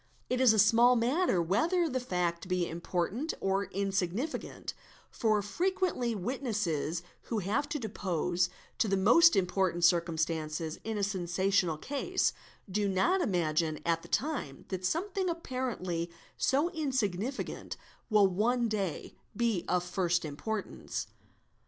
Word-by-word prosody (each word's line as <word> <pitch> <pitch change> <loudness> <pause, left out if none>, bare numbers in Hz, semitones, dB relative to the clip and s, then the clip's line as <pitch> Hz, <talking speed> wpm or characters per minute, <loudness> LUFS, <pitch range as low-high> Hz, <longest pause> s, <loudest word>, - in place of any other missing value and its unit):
It 255 0 +1
is 255 -3 +7
a 220 - +2
small 230 +4 +6
matter 245 - +2
whether 330 - +2
the 260 -4 -1
fact 180 -7 -2
be 180 -1 0
important 180 - -2
or 195 +1 0
insignificant, 195 - -2 0.4
for 215 -2 +2
E - - 0
frequently 340 - 0
witnesses 195 - -2 0.2
who 230 - -2
have 215 +10 0
to 295 - -1
depose 180 - -1 0.3
to - - +3
the 195 -1 +2
most 240 - +6
important 180 -2 +1
circum 170 -2 +3
stances 155 0 -2
in 220 -1 -3
a 205 - -1
sensational 185 -2 +1
case, 290 - 0 0.3
do 200 +1 0
not 345 - +2
imagine 165 - +1
at 165 -1 +1
the - - -12
time 270 - -2
that 185 -1 -4
something 375 - -1
© - - +1
apparently 245 - -3 0.3
so 295 +6 +2
insignificant 260 - -2 0.3
will 210 -2 +6
one 230 +6 +2
day 200 -6 -3 0.2
be 230 -7 +1
of 180 -1 +1
first 175 -1 0
importance. 200 +9 -4
200 Hz, 135 wpm, -31 LUFS, 175-250 Hz, 0.4 s, is